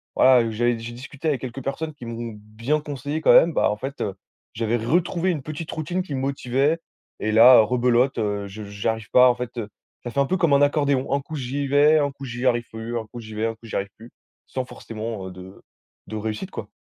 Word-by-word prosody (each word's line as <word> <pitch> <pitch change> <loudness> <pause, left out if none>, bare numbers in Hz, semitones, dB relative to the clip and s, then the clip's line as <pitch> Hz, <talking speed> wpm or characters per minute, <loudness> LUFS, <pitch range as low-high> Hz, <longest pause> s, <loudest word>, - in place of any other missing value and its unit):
voilà, 130 -1 +6
heu, 115 -1 -1
j'avais 120 +2 +1
d 115 - -8
j'ai 120 - -6
discuté 140 +5 -7
avec 135 -5 0
quelques 130 0 -6
personnes 155 +3 -3
qui 125 - -11
m'ont 115 0 -5
bien 115 +8 -2
conseillé 145 +1 -4
quand - - +5
même, 165 -1 +6
bah - - +3
en 105 - -3
fait, 135 +6 -6
heu, 100 - -1 0.4
j'avais 115 +1 0
retrouvé 175 +9 +1
une 155 - -3
petite 155 +3 -6
routine 175 +4 -2
qui 145 -7 -5
me - - -2
motivait 135 +3 0 0.4
et 110 - -1
là, 120 +3 +9
heu, - - +9
rebelote, 125 +2 +2
heu, 105 -2 -1
je 105 +2 -8
j'arrive 105 +2 -3
pas 125 0 +7
en 120 - +2
fait, 125 0 -6
heu. 110 -2 -4 0.3
Ca 120 - -5
fait 140 - -1
un 140 - +4
peu 185 - 0
comme 170 -4 +2
un 140 - +5
accordéon! 145 -2 +2
Un 140 - +1
coup 155 +3 -8
j'y 135 +2 -3
vais, 145 +3 +5
un 145 -1 +1
coup 135 0 -10
j'y 120 0 -5
arrive 120 -1 +2
plus, 115 +1 -4
un 115 - -4
coup 120 - -9
j'y 110 -1 -10
vais, 110 +1 -1
un 115 - -1
coup 115 +1 -18
j'y 110 - -6
arrive 100 0 -1
plus, 115 +2 -13 0.4
sans 130 -1 -3
forcément, 110 -5 -6
heu, 95 - -7
de 95 +1 -12 0.5
de 110 - -6
réussite 110 - -4
quoi. - - -6
125 Hz, 250 wpm, -23 LUFS, 110-145 Hz, 0.5 s, là